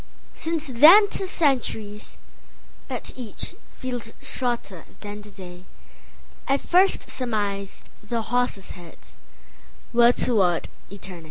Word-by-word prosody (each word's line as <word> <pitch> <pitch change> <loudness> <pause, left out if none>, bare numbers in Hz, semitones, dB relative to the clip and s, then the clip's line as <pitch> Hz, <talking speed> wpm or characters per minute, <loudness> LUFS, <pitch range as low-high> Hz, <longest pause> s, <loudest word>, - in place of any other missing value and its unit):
Since 325 -1 -2
then 315 - +8
'tis 385 -2 -2
centuries; 230 - -1 0.7
but - - -5
eachFeels 245 0 -6
shorter 235 -8 -3 0.2
than 205 0 -7
the 210 - -12
dayI 185 +8 -7
first 370 +3 +2
surmised 205 -5 -2
the 225 +2 -3
horses' 245 -5 -1
headsWere 235 +6 -2
toward 190 -8 +2 0.2
eternity. 190 -3 -8
230 Hz, 90 wpm, -24 LUFS, 200-260 Hz, 0.7 s, then